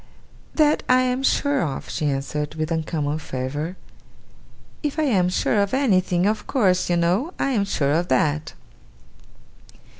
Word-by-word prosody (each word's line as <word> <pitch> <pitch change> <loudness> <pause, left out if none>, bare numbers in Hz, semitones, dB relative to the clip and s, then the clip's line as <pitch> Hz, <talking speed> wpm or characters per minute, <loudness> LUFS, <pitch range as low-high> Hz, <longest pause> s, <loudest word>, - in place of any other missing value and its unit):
'That 305 -1 +3
I 255 0 +5
am 255 0 0
sure 285 0 +1
of,' 140 -4 -3
she 150 - -1
answered, 145 +2 -3
with 155 +1 -3
uncommon 155 -2 -1
fervour. 145 +5 -4 1.0
'If 295 -1 -3
I 315 - +1
am 195 -11 +2
sure 205 +3 +1
of 200 +5 0
anything, 185 -9 +2
of 215 +1 -1
course, 185 -9 +2
you 175 - +2
know, 185 - 0
I 275 - 0
am 210 -6 +1
sure 145 -8 0
of 170 +4 +1
that. 150 +4 0
180 Hz, 150 wpm, -23 LUFS, 155-250 Hz, 1.0 s, I